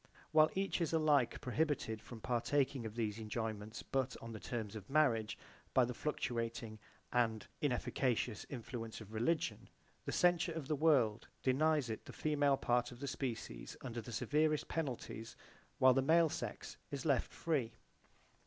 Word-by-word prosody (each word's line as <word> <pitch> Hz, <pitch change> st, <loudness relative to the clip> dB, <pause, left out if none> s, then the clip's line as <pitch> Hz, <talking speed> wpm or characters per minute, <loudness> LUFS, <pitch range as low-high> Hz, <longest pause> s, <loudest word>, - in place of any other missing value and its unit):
While 155 Hz, 0 st, +6 dB
each 195 Hz, -1 st, 0 dB
is 165 Hz, -1 st, 0 dB
alike 150 Hz, -6 st, +3 dB
prohibited 135 Hz, -5 st, 0 dB
from 115 Hz, 0 st, -10 dB
partaking 125 Hz, +1 st, +1 dB
of 110 Hz, -, -9 dB
these 110 Hz, -2 st, -1 dB
enjoyments 110 Hz, -1 st, -4 dB
but 135 Hz, -1 st, -1 dB
on 115 Hz, -, -8 dB
the 110 Hz, -, -6 dB
terms 110 Hz, -3 st, -4 dB
of 105 Hz, -2 st, -8 dB
marriage 120 Hz, -8 st, +3 dB, 0.4 s
by 130 Hz, -, +6 dB
the 125 Hz, -, -3 dB
fluctuating 115 Hz, -5 st, -3 dB, 0.3 s
and 115 Hz, -3 st, +2 dB, 0.2 s
inefficacious 125 Hz, -5 st, 0 dB
influence 115 Hz, -3 st, -5 dB
of 110 Hz, -1 st, -11 dB
religion, 145 Hz, +9 st, 0 dB, 0.4 s
the -, -, -2 dB
censure 175 Hz, -1 st, +3 dB
of 160 Hz, -4 st, -5 dB
the 155 Hz, -, +1 dB
world 135 Hz, -8 st, +3 dB, 0.2 s
denies 145 Hz, -1 st, +3 dB
it 110 Hz, -, -5 dB
[to] -, -, -7 dB
the -, -, -14 dB
female 145 Hz, -2 st, +3 dB
part 120 Hz, -1 st, +1 dB
of 120 Hz, -, -11 dB
the 140 Hz, -, -4 dB
species 125 Hz, -, -4 dB
under 120 Hz, -3 st, -4 dB
the 120 Hz, -, -9 dB
severest 150 Hz, +6 st, +1 dB
penalties 125 Hz, -7 st, -4 dB, 0.4 s
while 130 Hz, 0 st, +7 dB
the 135 Hz, -, +3 dB
male 165 Hz, +4 st, +5 dB
sex -, -, -5 dB
is 140 Hz, +1 st, -4 dB
left 140 Hz, -5 st, +2 dB
free. 140 Hz, -9 st, -1 dB
125 Hz, 160 wpm, -37 LUFS, 115-150 Hz, 0.4 s, while